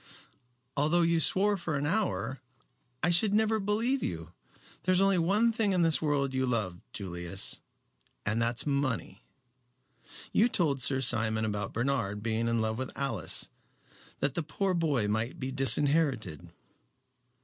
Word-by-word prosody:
"Although 155 +4 +2
you 165 0 +2
swore 200 +5 +3
for 160 -5 -2
an 140 - -2
hour, 165 - -1 0.6
I 175 - +4
should 200 +4 +3
never 220 0 +2
believe 225 +6 0
you. 80 -1 -5 0.5
There 185 - +1
is 185 - +3
only 195 -1 +3
one 205 +7 +3
thing 220 -3 +1
in 180 -2 +2
this 160 -5 +2
world 140 -3 0
you 130 0 0
love, 105 -8 -1
Julius, 90 -1 -3 0.7
and 110 +3 0
that 115 +1 0
is - - -8
money. 140 -9 -2 1.1
You 225 - +4
told 150 - +1
Sir 130 +1 +1
Simon 110 -3 +1
about 105 -2 -3
Bernard 115 -5 -1
being 115 0 -1
in 115 -1 +1
love 110 +1 -1
with 130 - -4
Alice, 115 - -2 0.7
that 140 -1 +1
the 170 - -1
poor 185 +5 -1
boy 150 -11 +1
might 110 +4 -2
be 130 0 -3
disinherited." 140 - +1
140 Hz, 150 wpm, -30 LUFS, 110-175 Hz, 1.1 s, I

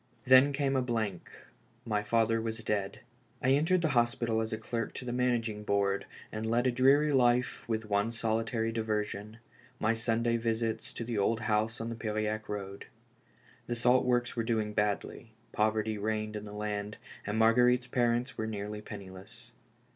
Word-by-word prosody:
Then 130 +2 +7
came 140 -1 0
a 130 - +3
blank, 110 -7 -2 0.6
my 105 -3 0
father 115 +1 +2
was 110 0 -4
dead. 100 -2 -2 0.4
I 130 - +2
entered 165 +6 +3
the 160 - +2
hospital 120 -2 +1
as 110 +1 -3
clerk 115 0 -4
to 125 - -6
the 120 - -3
managing 120 -4 0
board 100 -1 0 0.2
and 110 +1 -3
led 120 +2 +2
a 130 - +3
dreary 140 +4 +4
life 125 -2 +2
with 110 -1 -1
one 100 +1 +1
solitary 115 0 -1
diversion: 110 -1 -3 0.4
my 110 +1 +2
Sunday 115 +1 +1
visits 115 -1 -2
to - - -5
the 115 -2 -2
old 110 +3 +1
house 110 +1 0
on 115 +1 -4
the 115 - -4
Piriac 110 -1 -2
road. 100 -1 -5 0.8
The 120 - -2
salt 125 +2 +4
works 120 -1 +1
were 115 - 0
doing 110 -2 -1
badly; 105 +2 -2 0.2
poverty 110 0 0
reigned 110 0 -2
in 105 0 -5
the 105 - -9
land, 105 0 -4 0.3
and 105 +1 -1
Marguerite's 125 +2 +4
parents 125 0 0
were 110 - -1
nearly 105 0 -5
penniless. 105 +3 -10
115 Hz, 165 wpm, -31 LUFS, 105-120 Hz, 0.8 s, Then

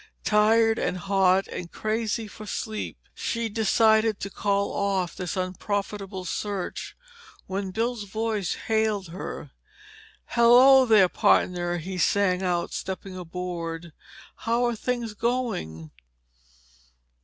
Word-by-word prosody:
Tired 220 +1 +4
and 185 - -1
hot 195 0 +2
and 170 -1 -6
crazy 220 0 -2
for 215 0 -11
sleep, 215 +2 -4 0.2
she 230 -1 -2
decided 220 0 +3
to 200 - -4
call 200 0 0
off 195 -3 -1
this 180 -1 -4
unprofitable 195 +1 -3
search, 200 +1 -4 0.5
when 195 0 -3
Bill's 225 +2 -2
voice 215 -2 -2
hailed 220 -4 0
her. 175 +3 -7 0.7
"Hello, 255 +3 +6
there, 210 -5 +6
pardner," 175 0 +2
he 180 +2 -5
sang 185 0 +2
out, 175 -2 -1
stepping 190 0 -5
aboard. 170 -2 -5 0.4
"How 235 +2 0
are 240 -1 0
things 235 -1 -3
going?" 210 - -2
200 Hz, 110 wpm, -26 LUFS, 185-225 Hz, 0.7 s, Hello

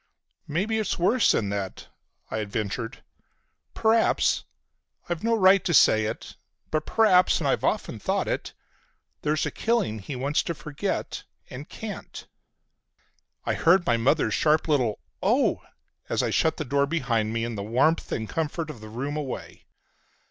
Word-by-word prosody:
"Maybe 205 +8 0
it's 215 - -1
worse 225 +7 +3
than 105 - 0
that," 100 -2 -5 0.4
I 110 0 -1
ventured. 115 +3 -4 0.7
"P'r'aps—I've 220 -5 -1
no 230 0 +2
right 190 -2 +5
to 170 - +1
say 110 -4 +5
it—but 150 +7 -6
p'r'aps, 195 -5 +4
and - - -1
I've - - +1
often - - -1
thought - - -1
it, - - -3 0.7
there's 150 0 0
a - - -2
killing 225 - 0
he 130 +7 -6
wants 140 +4 0
to 170 - -4
forget, 150 -1 -4 0.3
and 135 +5 -8
can't!" 220 -2 -8 1.2
I - - +1
heard 175 +2 +4
my 120 - +3
mother's 135 +7 +2
sharp 155 +1 +2
little 125 -9 +1 0.2
"Oh!" - - +2 0.5
as - - +1
I - - 0
shut 160 - +2
the 155 - -3
door 140 +2 +1
behind 120 -9 0
me 115 0 -1
and 115 -1 -4
the 100 - -4
warmth 125 +10 +1
and 110 - -2
comfort 160 +2 -3
of 120 - -13
the 110 - -9
room 135 +7 -4
away. 145 -4 -6
150 Hz, 150 wpm, -26 LUFS, 115-175 Hz, 1.2 s, right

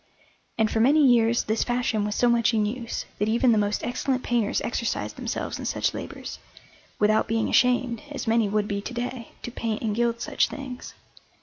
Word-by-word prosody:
And 220 -1 +2
for 225 - 0
many 285 +6 +5
years 235 -2 +4
this 220 +1 0
fashion 240 -3 0
was 210 0 -2
so 245 - +3
much 235 -1 +3
in 215 -1 +2
use 230 +2 -4
that 210 +2 +1
even 235 +2 +3
the 220 - +4
most 205 0 0
excellent 255 +1 -1
painters 235 -4 +1
exercised 235 -1 -2
themselves - - -4
in - - -6
such - - 0
labours, - - -7 0.6
without 215 +1 +3
being 225 0 0
ashamed, 250 -2 +2
as 290 - -5
many 225 -2 +2
would 210 0 0
be 200 -1 -2
to 245 - -7
day, 240 -1 -4 0.2
to 240 - -5
paint 225 -2 -3
and 215 -2 0
gild 235 0 +1
such - - +1
things. 260 -3 -8
230 Hz, 195 wpm, -25 LUFS, 215-245 Hz, 0.6 s, many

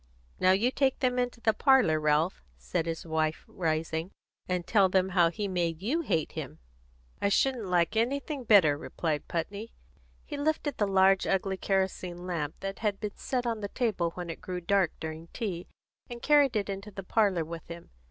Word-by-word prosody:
"Now 185 - +4
you 215 +7 +3
take 265 -1 +1
them 250 -1 +1
into 245 -1 -2
the 220 - +3
parlour, 255 - +4
Ralph," 155 +4 +1 0.2
said 170 -2 -2
his 165 0 -4
wife, 160 -1 -1
rising, 160 0 -2 0.4
"and 180 -1 -1
tell 200 -4 +4
them 190 0 +2
how 175 -3 +4
he 205 +4 -3
made 175 -2 -1
you 295 +11 +1
hate 165 - -1
him." - - -6 0.6
"I 200 - +2
shouldn't 240 0 +1
like 180 +3 +2
anything 275 +4 -1
better," 185 -10 +5
replied 155 -2 -3
Putney. 200 +7 -4 0.5
He 295 - -6
lifted 295 -1 -1
the 205 - +1
large 195 0 +4
ugly 195 0 0
kerosene 185 -2 -1
lamp 155 -5 -3
that 195 0 -4
had 210 -3 -1
been 210 -2 -4
set 250 -2 -2
on 230 -2 -1
the 205 - -3
table 210 -9 0
when 175 -2 -5
it - - -9
grew 180 -1 -4
dark 190 0 +2
during 160 +1 -6
tea, 185 -7 -4 0.4
and 240 -1 -7
carried 285 -2 +4
it 205 -2 0
into 200 +1 -5
the 195 -1 -8
parlour 190 -5 +2
with 165 0 -8
him. 170 0 -10
190 Hz, 185 wpm, -29 LUFS, 170-225 Hz, 0.6 s, better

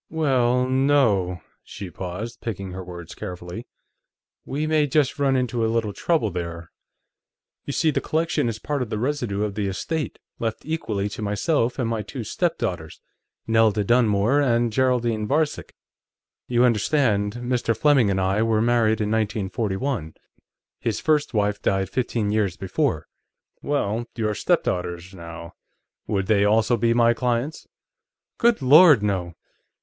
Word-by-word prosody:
"Well, 130 -5 +2
no." 130 - +2 0.2
She 95 -3 -8
paused, 95 +7 -6
picking 100 -4 -5
her 95 0 -6
words 85 -2 -9
carefully. 90 +6 -7 0.8
"We 145 +3 -2
may 155 -1 +2
just 145 +1 +1
run 135 -1 +2
into 125 -2 0
a 110 - +1
little 115 -3 -1
trouble, 155 - 0
there. 85 -1 -6 0.9
You 140 - -4
see, 160 +2 +2
the - - -1
collection 160 -5 0
is 110 - -4
part 145 +4 -3
of 125 - -3
the 110 - -2
residue 120 -5 -1
of 105 -2 -2
the 105 -1 -2
estate, 150 - -3 0.2
left 115 -1 -3
equally 110 -11 -2
to 105 - -7
myself 115 +5 0
and 125 -4 -1
my 115 -1 -1
two 115 +4 -6
stepdaughters, 95 - -2 0.5
Nelda 110 -2 +3
Dunmore 120 +3 +3
and 120 -4 +1
Geraldine 120 -4 +1
Varcek. 150 +3 -1 0.7
You 120 0 +2
understand, 110 -3 +1
Mr. 120 -2 -1
Fleming 140 -8 +4
and 95 -1 0
I 95 +3 +1
were 110 -1 +2
married 115 -1 +2
in 105 0 -1
1941; 105 - -2 0.6
his 110 -3 -2
first 150 -5 +1
wife 105 -1 0
died 95 -1 0
fifteen 115 -4 -1
years 105 -4 0
before." 95 -2 -1 0.6
"Well, 120 -5 -1
your 110 -3 -1
stepdaughters, 90 -2 -1
now; 85 -1 -9 0.5
would 100 -2 0
they 100 -1 +3
also 110 +3 +3
be 115 0 +1
my 120 0 +4
clients?" 125 +5 -2 0.7
"Good 235 - +3
Lord, 150 - +7
no!" 90 -5 -2
115 Hz, 145 wpm, -23 LUFS, 100-130 Hz, 0.9 s, Lord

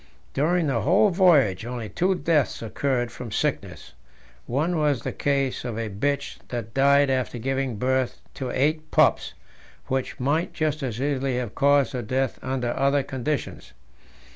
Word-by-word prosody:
During 165 +4 +1
the 130 -6 0
whole 195 +6 +4
voyage 150 - +4
only 120 -1 -5
two 185 - 0
deaths 150 -7 0
occurred 120 +1 -1
from 115 -1 -8
sickness - - -3 0.5
one 155 +7 0
was 145 -4 +1
the - - -2
case 140 -2 -1
of 120 -3 -4
a 115 -2 -3
bitch 140 +8 -2
that 115 -3 -5
died 140 0 +4
after 130 -2 -1
giving 135 0 -2
birth 130 +2 0
to 130 -2 -5
eight 155 +5 0
pups - - +2 0.5
which 130 0 -2
might 145 +7 0
just 155 -1 -1
as 120 -4 -3
easily 135 -2 -1
have 120 -4 -3
caused 140 -2 +3
her 125 - -2
death 130 +3 -1
under 125 -2 -2
other 140 0 +2
conditions. 135 +3 -4
135 Hz, 155 wpm, -25 LUFS, 125-145 Hz, 0.5 s, whole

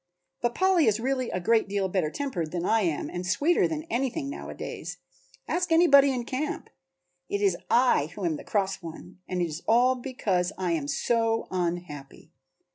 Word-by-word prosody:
But 240 0 0
Polly 370 -6 +3
is 215 0 +3
really 255 0 -1
a 185 - -2
great 225 +4 +2
deal 200 -1 0
better 180 -4 0
tempered 180 - -3
than 175 -1 -2
I 225 +2 +3
am 165 -6 -1
and 180 - -5
sweeter 290 - +2
than 310 -1 -4
anything 275 0 -2
nowadays; - - -7 0.5
ask 355 -1 -1
anybody 280 -5 +6
in 250 -2 -2
camp. 275 +4 -4 0.6
It 200 - -1
is 200 -3 +2
I 240 - +4
who 200 - -4
am 160 -3 0
the - - -10
cross 195 -2 -1
one. 165 +2 -10
And 180 -1 -1
it - - 0
is 155 +1 -6
all 245 +3 +5
because 205 -8 -1
I 185 -2 -1
am 155 -4 -1
so 225 +8 0
unhappy." 175 -6 -4
220 Hz, 180 wpm, -27 LUFS, 180-265 Hz, 0.6 s, anybody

